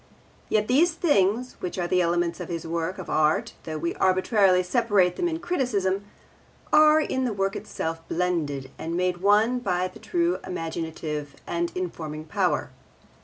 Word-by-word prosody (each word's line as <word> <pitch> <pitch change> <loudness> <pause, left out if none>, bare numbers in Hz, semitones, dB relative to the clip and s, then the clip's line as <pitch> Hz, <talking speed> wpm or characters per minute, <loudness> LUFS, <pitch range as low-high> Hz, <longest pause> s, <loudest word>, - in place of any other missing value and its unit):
Yet 215 -1 +2
these 315 +7 +4
things, 250 - +1
which 180 - -4
are 175 - 0
the 180 +1 +2
elements 170 0 0
of - - -6
his 170 -2 -4
work 165 +2 -2
of 185 - -7
art 155 0 +1
though 155 -1 -4
we 170 +2 -2
arbitrarily 185 0 +3
separate 190 -3 +2
them 350 - 0
in 325 -1 -2
criticism, 205 - -1 0.7
are 305 0 +7
in 260 -4 -1
the 245 -4 0
work 195 0 -1
itself 165 0 -4
blended 155 -7 -1
and 165 +1 -3
made 180 0 0
one 210 +6 +3
by 185 -5 0
the - - -13
true 345 -1 0
imaginative 160 -4 -4
and 170 0 -2
informing 155 -4 -5
power. 155 - 0
185 Hz, 160 wpm, -25 LUFS, 170-220 Hz, 0.7 s, are